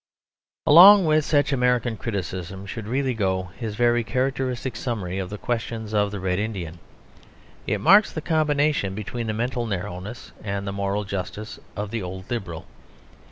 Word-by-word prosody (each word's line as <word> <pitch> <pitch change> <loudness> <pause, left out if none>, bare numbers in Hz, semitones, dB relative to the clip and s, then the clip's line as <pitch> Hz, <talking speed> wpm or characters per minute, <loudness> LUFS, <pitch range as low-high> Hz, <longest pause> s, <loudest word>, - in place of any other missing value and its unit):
Along 190 +5 +9
with 155 -1 +3
such 145 -1 +2
American 125 -2 +1
criticism 95 -3 -5
should 105 +1 -6
really 130 +2 0
go 95 -4 -1
his 110 -4 -5
very 120 +1 +2
characteristic 130 +1 -2
summary 95 -7 -3
of 95 -2 -4
the 105 - -6
question 115 -1 -3
of 105 -1 +2
the 100 -1 -5
Red 90 0 -1
Indian. 90 -6 -4 0.9
It 105 - 0
marks 200 - +6
the - - -4
combination 150 - +1
between 115 +2 -4
the 110 - -1
mental 120 +1 -2
narrowness 95 +3 -5
and 100 -1 -3
the 100 - -3
moral 100 +1 -1
justice 100 +2 -5 0.2
of 105 0 -4
the 115 -1 -2
old 95 +2 -7
Liberal. 90 -9 -4
110 Hz, 160 wpm, -24 LUFS, 100-125 Hz, 0.9 s, Along